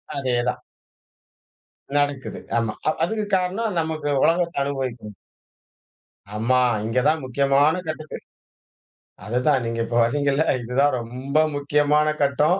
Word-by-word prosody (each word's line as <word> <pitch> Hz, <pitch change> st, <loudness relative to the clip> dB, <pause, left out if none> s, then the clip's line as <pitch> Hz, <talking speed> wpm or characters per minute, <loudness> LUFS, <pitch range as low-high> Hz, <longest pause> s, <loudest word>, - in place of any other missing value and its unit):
அதேதான். 125 Hz, -3 st, -1 dB, 1.4 s
நடக்குது. 145 Hz, -2 st, -1 dB, 0.2 s
ஆமா. 115 Hz, -2 st, 0 dB
அ -, -, +5 dB
அதுக்கு 215 Hz, +4 st, -1 dB
காரணம் 190 Hz, +3 st, -2 dB
நமக்கு 155 Hz, -2 st, -2 dB
உலகத்தை 170 Hz, 0 st, +1 dB
அனுபவிக்கணும். 130 Hz, -6 st, -4 dB, 1.2 s
ஆமா. 120 Hz, +4 st, +2 dB, 0.3 s
இங்க 115 Hz, +3 st, +1 dB
தான் 155 Hz, -3 st, 0 dB
முக்கியமான 140 Hz, +4 st, +3 dB
கட்டுக்கு 155 Hz, 0 st, -5 dB, 1.1 s
அதுதான். 125 Hz, +4 st, +1 dB
நீங்க 115 Hz, 0 st, -3 dB
இப்ப 120 Hz, -, -2 dB
வரீங்கல்ல. 145 Hz, +3 st, +1 dB, 0.2 s
இதுதான் 130 Hz, +4 st, +1 dB
ரொம்ப 130 Hz, +5 st, -2 dB, 0.2 s
முக்கியமான 150 Hz, +1 st, +2 dB
கட்டம், 150 Hz, +6 st, +2 dB
140 Hz, 105 wpm, -23 LUFS, 125-155 Hz, 1.4 s, அ